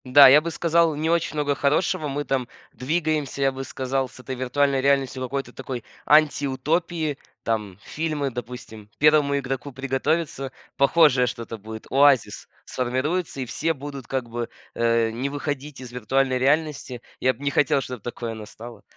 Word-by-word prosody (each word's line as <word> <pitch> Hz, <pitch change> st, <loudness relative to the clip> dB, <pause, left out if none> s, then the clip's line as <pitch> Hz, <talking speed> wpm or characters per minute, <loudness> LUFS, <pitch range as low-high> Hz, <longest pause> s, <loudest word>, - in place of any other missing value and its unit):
Да, 135 Hz, +2 st, +9 dB
я 140 Hz, +3 st, +8 dB
бы 170 Hz, -, -3 dB
сказал, 165 Hz, -1 st, +2 dB
не 155 Hz, +2 st, 0 dB
очень 170 Hz, -2 st, 0 dB
много 145 Hz, -1 st, +1 dB
хорошего. 150 Hz, +2 st, +1 dB
Мы 145 Hz, +1 st, -2 dB
там 130 Hz, -3 st, -1 dB, 0.3 s
двигаемся, 155 Hz, -1 st, -1 dB
я 135 Hz, -, +3 dB
бы 135 Hz, 0 st, -6 dB
сказал, 130 Hz, 0 st, -2 dB
с 130 Hz, -, -16 dB
этой 130 Hz, +1 st, -6 dB
виртуальной 135 Hz, +2 st, +1 dB
реальностью 135 Hz, -1 st, +1 dB
к -, -, -1 dB
какой-то 135 Hz, +2 st, -4 dB
такой 130 Hz, -2 st, -6 dB, 0.2 s
антиутопии. 155 Hz, +2 st, +2 dB, 0.3 s
Там 105 Hz, -5 st, -2 dB
фильмы, 155 Hz, -3 st, -2 dB
допустим, 120 Hz, -3 st, -8 dB
"Первому 150 Hz, -1 st, +4 dB
игроку 135 Hz, 0 st, -4 dB
приготовиться", 135 Hz, +2 st, -1 dB, 0.3 s
похожее 140 Hz, -3 st, +5 dB
что-то 115 Hz, -1 st, -5 dB
будет. 110 Hz, +1 st, -9 dB
"Оазис" 135 Hz, -3 st, +3 dB, 0.2 s
сформируется, 135 Hz, +5 st, -2 dB
и -, -, -2 dB
все 160 Hz, +7 st, -1 dB
будут 140 Hz, -3 st, -8 dB
как 130 Hz, -3 st, -2 dB
бы, 120 Hz, 0 st, -4 dB, 0.2 s
э, 115 Hz, -1 st, +2 dB
не 125 Hz, +5 st, -3 dB
выходить 145 Hz, 0 st, -4 dB
из 125 Hz, -2 st, -9 dB
виртуальной 130 Hz, +2 st, +1 dB
реальности. 140 Hz, -2 st, 0 dB, 0.2 s
Я 130 Hz, 0 st, +3 dB
бы 135 Hz, -, -13 dB
не 140 Hz, -, 0 dB
хотел, 140 Hz, -1 st, +3 dB
чтобы 125 Hz, -4 st, -7 dB
такое 120 Hz, 0 st, -5 dB
настало. 110 Hz, +2 st, -10 dB
135 Hz, 160 wpm, -24 LUFS, 125-145 Hz, 0.3 s, Да